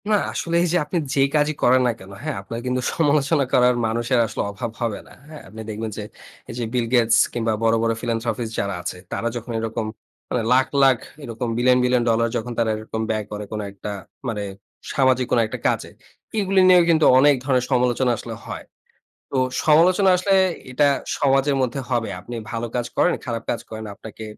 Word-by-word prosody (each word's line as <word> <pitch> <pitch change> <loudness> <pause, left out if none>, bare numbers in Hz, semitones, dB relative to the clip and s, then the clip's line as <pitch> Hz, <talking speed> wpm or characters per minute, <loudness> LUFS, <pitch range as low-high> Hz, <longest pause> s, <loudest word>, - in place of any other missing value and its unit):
না, 215 - +4 0.2
আসলে 170 0 -2
এইযে 175 0 +1
আপনি 175 - -2 0.2
যে - - 0 0.2
কাজই 150 0 +2
করেন 130 +1 +5
না - - +3
কেনো, 95 +1 -11
হ্যাঁ? 155 -3 -2
আপনার 115 +4 -6
কিন্তু 125 0 0
সমালোচনা 145 -1 +2
করার, 125 0 +5
মানুষের 120 +3 0
আসলে - - -4
অভাব 110 +3 -5
হবে 115 -3 -1
না। - - -16
হ্যাঁ? 155 -1 -10
আপনি 110 +3 -9
দেখবেন 110 +1 -4
যে 105 - -4 0.5
এইযে, 120 +1 -4
বিল 120 -2 +1
গেটস 115 -2 +4 0.2
কিংবা 115 -2 0
বড়, 115 0 +4
বড় 115 0 +2
ফিলান্থ্রপিস্ট 115 -1 -2
যারা 100 -1 -1
আছে, 90 - -5
তারা 115 - -2
যখন 120 0 -6
এরকম 115 0 -3 0.4
মানে 120 - -1
লাখ, 130 +1 +4 0.2
লাখ 135 -2 +5 0.3
এরকম 120 -1 -4
বিলিয়ন, 125 +1 +4
বিলিয়ন 125 -1 +2
ডলার, 115 +1 +2
যখন 120 +1 -5
তারা 115 -1 +2
এরকম 110 +1 -5
ব্যয় 110 -1 -1
করে 105 0 -5
কোনো 105 -1 -3
একটা 100 +1 -7 0.4
মানে, 105 -4 -2 0.5
সামাজিক 130 -2 +3
কোনো 120 - +4
একটা - - -6
কাজে। - - -1 0.5
এইগুলো 195 -2 +2
নিয়েও 180 -1 +7
কিন্তু 160 -2 +4
অনেক 145 +1 +6
ধরনের 130 -2 +1
সমালোচনা 125 0 +2
আসলে - - -7
হয়। - - -7 0.7
তো 135 - -1 0.3
সমালোচনা 180 +5 +5
আসলে 195 +2 +1 0.4
এটা 145 +3 +3 0.3
সমাজের 135 0 +2
মধ্যে 130 +2 -1
হবে। 120 -3 0
আপনি 120 +6 -8 0.2
ভালো 115 0 -3
কাজ 120 -1 0
করেন, 180 - +4
খারাপ 115 -3 -3
কাজ 120 - 0
করেন। 110 0 -7
আপনাকে 110 +1 -10
120 Hz, 190 wpm, -22 LUFS, 115-135 Hz, 0.7 s, নিয়েও